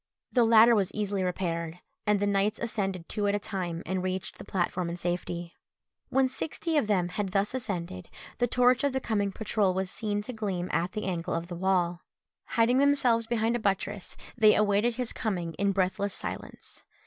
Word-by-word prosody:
The 245 - +4
ladder 230 +1 +7
was 200 -5 +2
easily 205 -2 -1
repaired, 170 -2 -2 0.3
and 210 -1 +3
the 205 - +1
knights 205 +2 +1
ascended 195 -7 -2
two 205 -1 -1
at 200 - +2
a - - 0
time, 180 -5 -4
and 185 +2 -1
reached 185 0 -3
the - - -7
platform 180 -1 -1
in 170 - -4
safety. 175 -1 -3 0.5
When 265 0 +3
sixty 320 +5 -3
of 290 -8 +2
them 185 -4 +1
had 195 0 -3
thus 200 +2 +1
ascended, 180 - -4 0.3
the 245 - +3
torch 250 +2 +3
of 280 -2 +1
the 265 - +1
coming 205 -5 0
patrol 205 -2 0
was 190 -1 -1
seen 205 -2 -2
to 250 - -5
gleam 195 -5 -3
at 170 +4 0
the 215 - -3
angle 175 -3 -2
of 170 +1 -4
the 175 - -5
wall. 175 -1 +1 0.4
Hiding 235 +3 +3
themselves 255 -5 +3
behind 230 0 +1
a - - 0
buttress, 200 -2 -2 0.2
they 215 -2 +6
awaited 210 +3 +2
his 250 -1 -2
coming 175 -6 -2
in 200 0 +3
breathless 195 +1 0
silence. - - -7
200 Hz, 190 wpm, -28 LUFS, 180-225 Hz, 0.5 s, ladder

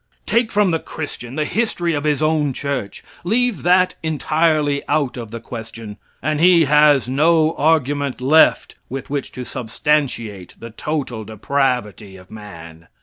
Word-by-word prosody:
Take 230 -1 +1
from 205 -3 +2
the 165 - 0
Christian 135 -6 -7
the 155 0 0
history 175 -5 -1
of 145 0 -2
his 150 0 +1
own 155 -3 +1
church; 140 -8 -4 0.2
leave 230 +2 0
that 180 +1 +3
entirely 155 -2 +1
out 145 -5 0
of 120 -3 -7
the 115 - -7
question, 115 -2 -9 0.3
and 155 -1 0
he 175 -1 +6
has 150 -2 +4
no 155 +4 +3
argument 145 -3 +1
left 145 +5 +4 0.2
with 135 +1 -6
which 140 -2 -3
to 125 - -6
substantiate 120 - -2
the 115 - -9
total 130 -3 -4
depravity 110 -3 -2
of 90 0 -17
man. 85 -6 -11
145 Hz, 145 wpm, -19 LUFS, 115-160 Hz, 0.3 s, he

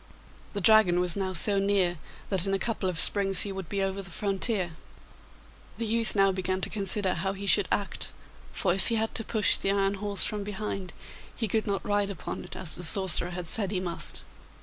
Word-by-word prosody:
The 200 - -4
Dragon 200 -4 +4
was 180 -2 0
now 190 -1 -3
so 195 +4 +1
near 195 -4 0 0.3
that 190 -1 +1
in 195 - 0
a - - 0
couple 210 -3 -3
of 170 -3 -2
springs 195 +1 +8
he 200 - -4
would 190 -3 -8
be 200 -1 -2
over 195 0 -3
the 180 - -10
frontier. 195 0 -1 1.1
The 230 - -4
youth 225 0 +2
now 195 -1 +3
began 185 0 -3
to - - -1
consider 195 -2 +1
how 190 +3 -3
he 200 +1 -8
should 200 -1 +3
act, 200 - -2 0.4
for 180 -4 -1
if 190 - +2
he 230 - 0
had 220 0 -2
to 225 - -2
push 220 -1 +1
the - - -2
iron 195 0 0
horse 200 0 -2
from 210 -1 -3
behind 200 -2 -6 0.4
he 225 - -3
could 220 +2 -2
not 200 -1 -3
ride 205 -1 0
upon 195 -5 -7
it - - -11
as 175 -4 -6
the - - -6
sorcerer 180 -1 +3
had 180 0 -7
said 200 +3 +1
he 190 -2 -2
must. 175 -2 -3
195 Hz, 215 wpm, -26 LUFS, 185-205 Hz, 1.1 s, springs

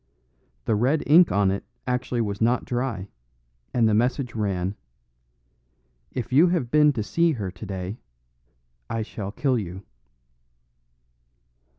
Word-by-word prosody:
The 115 - +1
red 130 +8 +2
ink 165 +4 +6
on 100 -1 +3
it 100 - -3 0.2
actually 125 -1 -1
was 100 -2 -3
not 120 +2 +2
dry, 120 -6 -2 0.6
and 115 -2 +3
the 110 - +2
message 120 +3 +1
ran, 95 -3 -1 1.4
"If 125 -1 -4
you 155 +7 +7
have 165 -9 0
been 150 -1 +6
to 110 -4 -2
see 165 - +2
her 100 -8 -4
today, 95 +1 -6 0.9
I 115 -1 -1
shall 100 -2 -6
kill 130 +2 +1
you." 95 -1 -7
115 Hz, 125 wpm, -25 LUFS, 100-130 Hz, 1.4 s, you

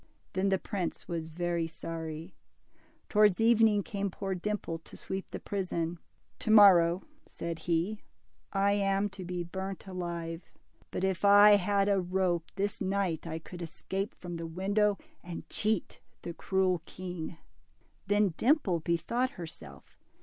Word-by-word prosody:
Then 190 +1 +1
the 190 - +3
prince 185 -2 -4
was 165 -2 -3
very 170 0 -1
sorry. 165 +1 -6 0.7
Towards 210 -2 +4
evening 225 -2 +5
came 200 0 -2
poor 195 +1 -3
Dimple 185 -3 -3
to - - -14
sweep 190 0 -5
the - - -6
prison. 175 -4 -2 0.4
To - - -4
morrow," 185 -5 +7 0.2
said 170 -1 -5
he, 175 +5 -1 0.5
I 200 0 +3
am 200 0 +1
to 195 -1 -9
be 180 0 -3
burnt 190 +2 -5
alive; 170 -2 -5 0.4
but - - -3
if 190 -1 0
I 205 +1 +8
had 200 +1 +1
a 200 -2 +3
rope, 180 -2 0
this 200 +1 -2
night 190 -4 -1
I 160 -1 -3
could 175 +2 -9
escape 190 +4 -4
from 175 -2 -6
the 165 0 -5
window, 200 +4 +1 0.3
and 175 -1 -7
cheat 215 -2 -1 0.2
the 170 - -5
cruel 185 -1 +1
king." 175 -3 -6 0.7
Then 205 -3 +3
Dimple 235 - +3
bethought 170 +11 0
herself. 80 - -10
185 Hz, 140 wpm, -31 LUFS, 170-200 Hz, 0.7 s, I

